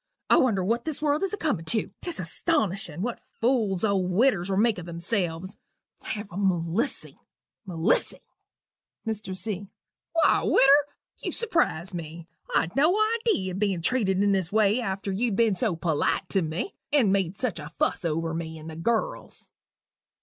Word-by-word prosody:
I - - +7
wonder 215 -8 +3
what 230 +5 0
this 315 -3 -2
world 300 0 +1
is 390 - 0
a 415 - -2
comin' 275 - -1
tew: 215 +6 -1
'tis 345 - -5
astonishin' 195 - -1
what 245 0 -3 0.2
fools 225 -6 +1
old 195 -3 +1
widdiwers 195 -2 +2
will 190 - 0
make 220 -2 +3
o' - - -6
themselves! 175 +1 -2 0.4
Have 205 -1 -5
Melissy! 190 - -1 0.5
Melissy!" 165 -3 0 0.8
MR. 210 -4 -3
C. 200 0 -2 0.5
"Why, 330 - +4
widder, 280 +2 +5 0.3
you - - -3
surprise 325 - 0
me. 165 -1 -7 0.3
I'd 165 - +1
no 310 +8 +4 0.2
idee 205 - 0
of 185 - -5
being 195 -5 0
treated 200 -6 +2
in 205 - +3
this 190 -3 0
way 215 +2 +3
after 195 -2 -3
you'd 215 +2 0
been 225 -1 +3
so 200 -2 0
polite 165 +3 0
to 195 - +2
me, 160 - -3 0.2
and 240 -10 +4
made 195 -1 0
such 225 -10 -2
a 150 0 -8
fuss - - 0
over 165 0 -1
me 160 -1 -5
and 160 +1 -9
the - - -8
girls." 220 +8 -2
195 Hz, 165 wpm, -26 LUFS, 175-235 Hz, 0.8 s, I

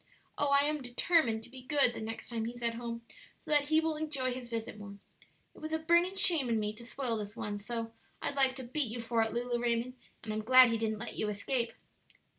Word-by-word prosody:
Oh, 290 - 0
I 280 0 +6
am 300 0 0
determined 245 -2 +2
to 240 - -11
be 260 -1 -10
good 275 -2 +2
the - - -6
next 225 +1 -6
time 230 -2 -2
he's 240 +1 -6
at 235 0 +1
home, 230 0 -5 0.4
so - - -9
that 290 -1 +4
he 315 +1 +4
will 320 -1 -1
enjoy 280 -5 -1
his 250 -1 -7
visit 225 -2 -5
more. 200 -1 -9 0.6
It - - -15
was 310 0 -6
a - - +3
burning 340 +4 +3
shame 330 -9 +4
in 225 -1 +2
me 210 0 -1
to 230 +2 -10
spoil 250 -4 -2
this 210 0 -6
one 205 0 -4
so; 230 +1 -4 0.3
I'd - - -2
like 265 -2 +3
to 260 - -7
beat 255 +1 -1
you 240 - -5
for 230 0 0
it, 225 0 +1
Lulu 240 0 -1
Raymond, 240 +1 0 0.3
and 215 - -4
I'm 215 0 -3
glad 255 +1 +8
he 225 - 0
didn't 220 -1 -1
let 240 +3 -7
you 215 - 0
escape." 235 +4 -1
240 Hz, 240 wpm, -32 LUFS, 225-280 Hz, 0.6 s, glad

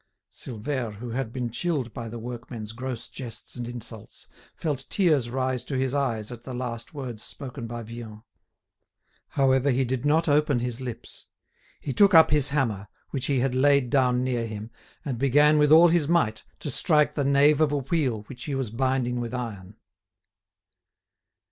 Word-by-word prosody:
Silvère, 120 -1 -4
who 120 +3 -7
had 120 -1 -3
been 120 -2 -3
chilled 135 -3 -2
by 115 -1 -6
the 120 - -7
workmen's 115 -2 -7
gross 125 0 -5
jests 120 -3 -7
and 120 -1 -5
insults, 120 -2 -9 0.3
felt 145 -5 -3
tears 155 - +2
rise 130 -1 -1
to 135 +1 -3
his 130 0 0
eyes 120 -6 -1
at 120 -2 -8
the 125 +1 -7
last 120 +2 -5
words 125 -6 -6
spoken 130 -4 -6
by 120 0 -6
Vian. 110 -1 -9 1.0
However, 135 0 +2
he 130 0 +2
did 125 0 -2
not 155 +3 +2
open 150 -2 +3
his 120 +1 -3
lips. 125 -3 -8 0.5
He 135 - -4
took 200 +2 +5
up 160 -2 +8
his 150 -3 +3
hammer, 115 -9 -1 0.2
which 135 -2 -2
he 135 -3 +1
had 130 -1 0
laid 140 -1 +3
down 125 -2 +3
near 120 -3 -1
him, 110 +1 -7 0.3
and 130 -5 -3
began 145 +3 +4
with 150 0 +4
all 165 +2 +8
his 165 -3 +2
might 160 -10 +1 0.2
to 145 - -1
strike 150 +3 +3
the 145 - -1
nave 140 +2 +4
of 155 -2 +3
a 145 - +1
wheel 135 -6 -1
which 125 +3 -9
he 145 - -2
was 130 -5 -2
binding 125 0 0
with 120 +1 -4
iron. 105 -6 -6
130 Hz, 175 wpm, -26 LUFS, 120-145 Hz, 1.0 s, up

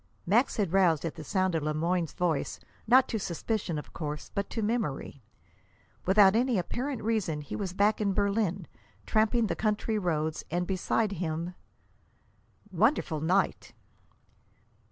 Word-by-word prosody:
Max 230 +9 +2
had 195 -5 0
roused 170 -5 +3
at 165 - -2
the - - -9
sound 185 +3 0
of 160 - 0
Le 150 +1 -1
Moyne's 170 +1 0
voice, 165 -5 -1 0.3
not 255 +3 +6
to 225 - -2
suspicion, 190 -1 -2
of 150 - -8
course, 150 -2 -5
but 200 0 -2
to 225 - -3
memory. 205 - -2 0.9
Without 195 +1 +6
any 245 -1 +2
apparent 245 +8 -3
reason, 205 -9 0
he 145 - -6
was 195 -3 -3
back 205 +3 +2
in 200 -2 +2
Berlin, 200 -3 0 0.4
tramping 220 +2 +2
the - - -1
country 215 0 0
roads, 160 -4 -1
and 175 +2 -1
beside 195 +3 0
him 170 -1 -3 1.2
"Wonderful 190 - +1
night!" 180 +5 0
190 Hz, 145 wpm, -29 LUFS, 165-215 Hz, 1.2 s, not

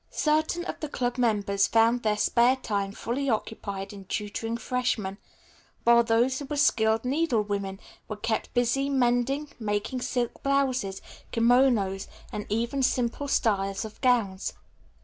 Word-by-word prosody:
Certain 315 +3 0
of - - -5
the 305 - -4
club 245 -2 -2
members 205 -4 +2
found 230 +2 +3
their 215 -2 +1
spare 240 +4 +4
time 200 -6 -2
fully 260 +6 -3
occupied 205 -3 -3
in 200 -1 -10
tutoring 210 +4 -3
freshmen, 225 -5 -2 0.6
while 235 0 +6
those 235 +3 +2
who 285 - -6
were 295 - -4
skilled 220 -4 +3
needlewomen 210 -9 0 0.3
were 215 - -4
kept 220 +1 -2
busy 245 +3 +1
mending, 265 +2 +1
making 215 +4 -2
silk 245 -1 -2
blouses, 260 -8 0 0.3
kimonos 230 -5 +3 0.2
and 210 -1 -5
even 235 +6 -1
simple 250 +2 0
styles 195 -5 0
of 215 - -11
gowns. 220 -7 +1
235 Hz, 135 wpm, -27 LUFS, 205-260 Hz, 0.6 s, while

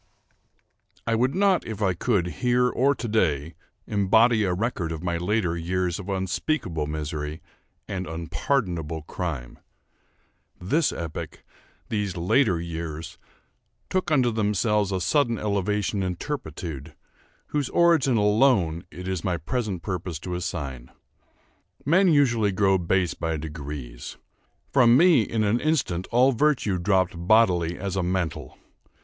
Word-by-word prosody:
I 115 - 0
would 125 +6 +1
not, 195 -1 +3
if 110 -2 -5
I 95 -3 +2
could, 95 0 0 0.2
here 125 0 +3
or 135 +3 +2
to 120 0 -5
day, 80 -8 0 0.3
embody 110 +3 +3
a 95 - +1
record 90 -3 -2
of 80 0 -5
my 85 -1 -1
later 90 -1 0
years 90 +1 -1
of 100 0 -8
unspeakable 95 - -1
misery, 75 0 -4 0.5
and 95 -1 -4
unpardonable 80 - -2
crime. 75 -8 -5 1.0
This 145 - +1
epoch—these 95 +4 -6
later 90 +2 +2
years—took 85 - -7
unto 130 -6 +3
themselves 105 -1 +1
a 95 - 0
sudden 115 - +1
elevation 105 0 -1
in 90 -1 -2
turpitude, 80 - -6 0.5
whose 145 -3 -1
origin 160 -8 +3
alone 105 -6 +3
it 90 +1 -8
is 95 -3 -2
my 90 -2 0
present 95 - -3
purpose 90 -3 -4
to 90 - -5
assign. 75 -8 -5 1.0
Men 185 +7 +4
usually 120 - +3
grow 95 -1 +2
base 90 0 +1
by 80 -1 -2
degrees. 75 -5 -7 0.6
From 120 -2 +6
me, 170 -4 +6
in 110 0 -1
an 105 +3 +2
instant, 125 - 0
all 125 +3 +4
virtue 120 -7 +1
dropped 95 0 +2
bodily 90 -2 +3
as 95 0 -4
a 95 - +1
mantle. 90 -1 -3
95 Hz, 130 wpm, -25 LUFS, 85-115 Hz, 1.0 s, From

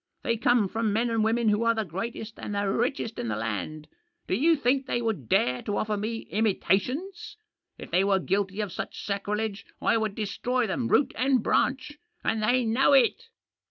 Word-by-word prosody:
They 230 - +1
come 230 -1 +3
from 225 +2 -1
men 230 +3 +1
and 225 -1 +1
women 225 0 +2
who 210 +1 +2
are 230 0 +3
the 220 -1 -1
greatest 215 +5 -6
and 205 - -5
the 200 0 0
richest 230 +2 -1
in 120 - -3
the 110 - -1
land. 115 +8 -4 0.4
Do - - -2
you 315 - +4
think 270 -1 +1
they 240 - 0
would 220 - -3
dare 125 0 +2
to 205 - -3
offer 215 0 -1
me 220 +2 -3
imitations? 225 - -1 0.4
If - - -10
they 180 +3 +3
were 195 -1 +3
guilty 195 +2 -1
of 205 -3 -3
such - - -6
sacrilege 205 +1 -2 0.2
I - - +2
would 220 -2 -2
destroy 240 +4 -1
them 230 +4 -2
root 285 - +3
and 255 -3 +2
branch. 270 +3 0 0.2
And 225 - 0
they 245 +3 +2
know 250 +5 +3
it!" 275 - +4
220 Hz, 195 wpm, -27 LUFS, 200-245 Hz, 0.4 s, you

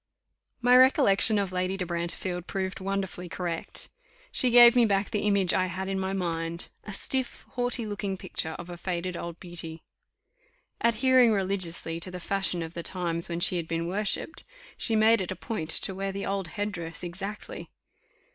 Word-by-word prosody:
My 245 +1 +5
recollection 255 -5 +6
of 200 -2 -1
Lady 185 +1 -1
de 185 - -2
Brantefield 175 +1 -4
proved 190 -1 -3
wonderfully 190 -2 -3
correct; 170 -1 -3 0.4
she 255 - +3
gave 240 0 +8
me 245 - +6
back 200 -2 +1
the 210 0 0
image 200 -3 +4
I 185 0 +2
had 185 +2 -4
in 195 0 -2
my 190 0 -2
mind 170 -2 -3 0.2
a 210 - -6
stiff, 260 +5 -1
haughty 245 -1 -1
looking 205 -2 -3
picture 160 -3 -3
of 175 +1 -8
a 175 - -7
faded 180 0 -3
old 170 0 -6
beauty. 165 -2 -7 1.0
Adhering 245 +1 +4
religiously 185 -5 -1
to 175 - -2
the 180 0 -7
fashion 185 -2 -1
of 165 0 -8
the 170 - -5
times 170 -1 -2
when 170 0 -3
she 180 - +3
had 165 -2 -3
been 165 0 -2
worshipped, 205 - -1 0.3
she 225 - +1
made 220 0 +5
it 185 - -3
a - - -3
point 185 -10 -5
to 190 - +3
wear 195 +1 -3
the 200 +1 -4
old 195 -2 -2
head 205 +5 -3
dress 165 -4 -6
exactly. 195 +4 -7
190 Hz, 180 wpm, -27 LUFS, 175-210 Hz, 1.0 s, gave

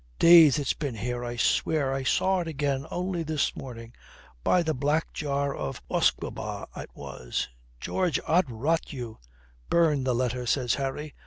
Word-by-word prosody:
Days 165 -5 +8
it's 145 -3 0
been 140 -6 -4
here, 120 +3 -3
I 120 0 -4
swear, 140 +3 +1
and 135 - 0
I - - -3
saw 190 +8 +2
it 170 - -3
again 140 -3 -2
only 180 -1 -2
this 155 -2 -1
morning. 115 -3 -9 0.5
By 180 - +3
the 160 -1 0
black 145 +4 0
jar 140 -2 -1
of 70 - -4
usquebaugh - - -1
it - - -7
was, - - -4 0.3
George, 180 - 0
Od 175 -3 +2
rot 145 +9 -1
you." 120 -6 -7 0.5
"Burn 155 -5 +3
the 130 -2 +1
letter," 125 0 -1
says 125 -2 +1
Harry. 140 +2 -3
140 Hz, 165 wpm, -27 LUFS, 125-160 Hz, 0.5 s, Days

